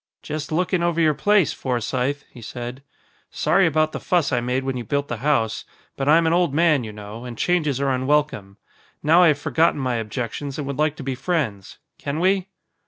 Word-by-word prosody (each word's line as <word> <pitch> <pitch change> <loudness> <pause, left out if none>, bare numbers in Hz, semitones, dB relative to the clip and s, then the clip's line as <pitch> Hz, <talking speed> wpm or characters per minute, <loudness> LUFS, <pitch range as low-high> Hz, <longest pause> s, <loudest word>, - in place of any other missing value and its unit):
"Just 150 0 -5
looking 180 +2 +1
over 170 -1 0
your 155 -2 +4
place, 205 +3 +3
Forsythe," 130 +3 -2
he 120 - -12
said. 120 +3 -7 0.5
"Sorry 195 - +2
about 155 0 +1
the - - -5
fuss 175 -6 +1
I 125 -2 +1
made 125 +2 -1
when 135 -1 -2
you 125 - -4
built 140 +6 -2
the 120 - -3
house. 115 -4 0 0.3
But 135 +1 -1
I'm 165 +2 +5
an 160 - +2
old 175 -5 +2
man, 155 -5 +3
you 110 - -6
know, 105 +2 -9
and 120 -2 -7
changes 155 -6 +1
are 140 -1 +1
unwelcome. 130 -7 0 0.5
Now 165 +4 +5
I 175 - +7
have 150 -3 +3
forgotten 160 +1 +2
my 130 -3 -1
objections 120 +5 -4
and 150 - -3
would 140 +1 -5
like 155 0 +2
to 150 - -8
be 135 0 -2
friends. 130 - -2 0.2
Can 145 +2 -3
we?" 190 +1 +2
140 Hz, 205 wpm, -22 LUFS, 125-160 Hz, 0.5 s, I